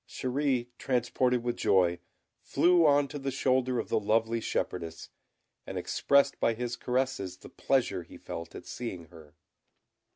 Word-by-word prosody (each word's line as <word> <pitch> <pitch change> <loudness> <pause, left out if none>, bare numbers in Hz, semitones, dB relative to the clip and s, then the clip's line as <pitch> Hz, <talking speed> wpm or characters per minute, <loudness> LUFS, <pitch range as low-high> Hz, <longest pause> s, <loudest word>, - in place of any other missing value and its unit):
Chéri, 130 -2 -1
transported 125 -1 +1
with 120 0 -1
joy, 90 -2 +3 0.4
flew 175 -2 +4
on 145 -1 +4
to 145 - -6
the 135 0 -2
shoulder 130 -1 +1
of 115 - -3
the 110 - +2
lovely 115 +2 +1
shepherdess, 85 -6 -3 0.6
and - - -5
expressed 140 0 +2
by 115 - +2
his 120 +1 -3
caresses 125 -8 -2
the - - -13
pleasure - - 0
he - - -13
felt 85 - -7
at - - -9
seeing 90 -10 -6
her. 75 -3 -15
120 Hz, 150 wpm, -29 LUFS, 100-130 Hz, 0.6 s, flew